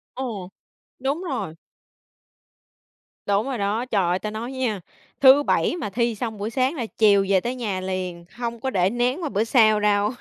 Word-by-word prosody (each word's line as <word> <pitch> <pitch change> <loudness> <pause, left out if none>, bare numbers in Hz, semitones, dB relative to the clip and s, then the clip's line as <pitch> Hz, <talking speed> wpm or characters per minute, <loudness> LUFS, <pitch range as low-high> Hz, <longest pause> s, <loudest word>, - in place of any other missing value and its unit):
Ồ. 225 -8 -5 0.5
Đúng 275 +7 -2
rồi. 205 - -4 1.7
Đúng 200 +2 +1
rồi 265 -2 -3
đó. 210 +4 -1
Trời 205 -7 +1
ơi, 180 +1 +1
ta 210 +3 -4
nói 230 +4 -5
nha, 250 -6 -2 0.4
thứ 275 +1 +8
Bảy 315 - +1
mà 310 - -4
thi 235 +2 0
xong 220 0 -4
buổi 205 +2 -3
sáng 260 +5 0
là 250 -6 -3
chiều 200 -3 +5
về 195 -1 +4
tới 240 +5 -3
nhà 205 -7 -3
liền, 185 -2 -4
hông 235 0 -4
có 265 - -2
để 185 -6 +2
nén 245 - -1
qua 305 - -1
bữa 210 -3 0
sau 220 -2 +4
đâu. 210 0 +2
225 Hz, 190 wpm, -23 LUFS, 200-255 Hz, 1.7 s, thứ